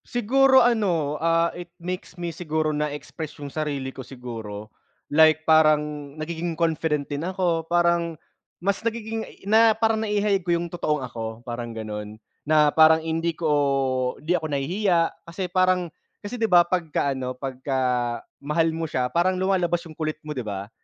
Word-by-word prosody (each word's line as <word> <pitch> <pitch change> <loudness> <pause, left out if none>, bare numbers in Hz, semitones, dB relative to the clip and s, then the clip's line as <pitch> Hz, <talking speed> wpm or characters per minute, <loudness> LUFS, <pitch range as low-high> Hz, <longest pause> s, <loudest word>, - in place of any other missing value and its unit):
Siguro 260 +2 +4
ano, 185 -11 +1
ah, 165 0 +2
it 175 0 -8
makes 180 +2 -6
me 170 -1 -4
siguro 155 -2 -1
na 150 0 0
express 150 +2 -7
yung 145 -1 -8
sarili 140 -4 -3
ko 135 - -8
siguro 115 -5 -8 0.4
like, 155 +1 +5
parang 150 -2 +3
nagiging 165 +2 -3
confident 160 -3 0
din 145 +1 -4
ako. 175 -4 0
Parang 170 -1 +2 0.5
mas 200 +1 +1
nagiging 225 -1 -2
i - - -16
na 220 +1 +6
parang 225 -1 +2
naihayag 205 -2 +1
ko 175 - +2
yung 170 0 -4
totoong 155 -4 -1
ako, 115 -2 -6 0.2
parang 120 -1 -5
ganun, 105 -1 -6 0.3
na 155 -1 +5
parang 160 0 +6
hindi 165 +1 -1
ko 135 -5 +1
hindi 160 +4 0
ako 160 - -5
nahihiya 175 +6 +1 0.3
kasi 170 +3 -4
parang 185 -1 +2 0.3
kasi, 215 +4 -6
di 225 - +1
ba, 180 -5 +6
pagka 165 -6 -1
ano, 130 -1 -3
pagka 130 +1 -4 0.7
mahal 160 +3 +2
mo 165 0 -2
siya 125 -3 -1
parang 180 +4 +1
lumalabas 180 -3 +1
yung 160 - -10
kulit 155 -1 -2
mo, 155 -1 -6
di - - -1
ba, 100 -1 -5
160 Hz, 165 wpm, -24 LUFS, 145-180 Hz, 0.7 s, na